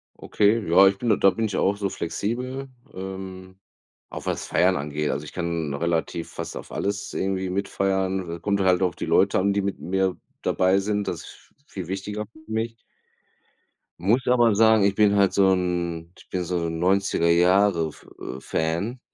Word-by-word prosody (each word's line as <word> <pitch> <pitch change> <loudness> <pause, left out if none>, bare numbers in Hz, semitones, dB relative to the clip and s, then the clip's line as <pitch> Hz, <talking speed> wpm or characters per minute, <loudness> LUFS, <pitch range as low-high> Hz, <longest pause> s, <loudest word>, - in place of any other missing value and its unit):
Okay, 105 -1 +1
ja, 95 +4 +7
ich 100 0 +2
bin 120 +1 -2
da 105 - +5
da 95 - +5
bin 115 +3 -1
ich 100 - -2
auch 100 +1 +1
so 100 -1 -1
flexibel, 125 +11 -4 0.2
ähm, 95 0 -8 0.5
auch - - -8
was - - -2
Feiern - - +3
angeht. 75 +1 -2
Also, 75 +2 -4
ich - - -10
kann 85 -4 -2
relativ 85 +1 -2
fast - - -6
auf - - -10
alles 100 +1 -3
irgendwie 95 -1 -1
mitfeiern. 95 -2 -1
Äh, - - -17
kommt 100 +2 0
halt 95 0 +3
auch 90 -3 +1
die - - -4
Leute 95 0 +3
an, 100 +1 +2
die 100 - +1
mit 100 0 -3
mir 95 0 0 0.2
dabei 95 +1 +2
sind. 105 0 -1
Das 85 - -3
ist - - -12 0.3
v 140 - -35
viel 90 -4 -7
wichtiger 105 +3 -4
für 125 +3 -17
mich. 115 +1 -2 1.2
Muss 115 +9 +1
aber 120 -3 +4
sagen, 110 0 +5
ich 100 0 +3
bin 105 0 +3
halt 100 -2 +3
so 95 -1 +4
'n 85 -2 -2
ich - - -18
bin 90 -1 -2
so 85 -1 -2
'n 80 0 -3
90er 95 -1 +2
Jahre 90 -1 +4
F 75 - -13 0.2
äh, 65 - -6
Fan. 85 - -2
95 Hz, 190 wpm, -24 LUFS, 85-100 Hz, 1.2 s, ja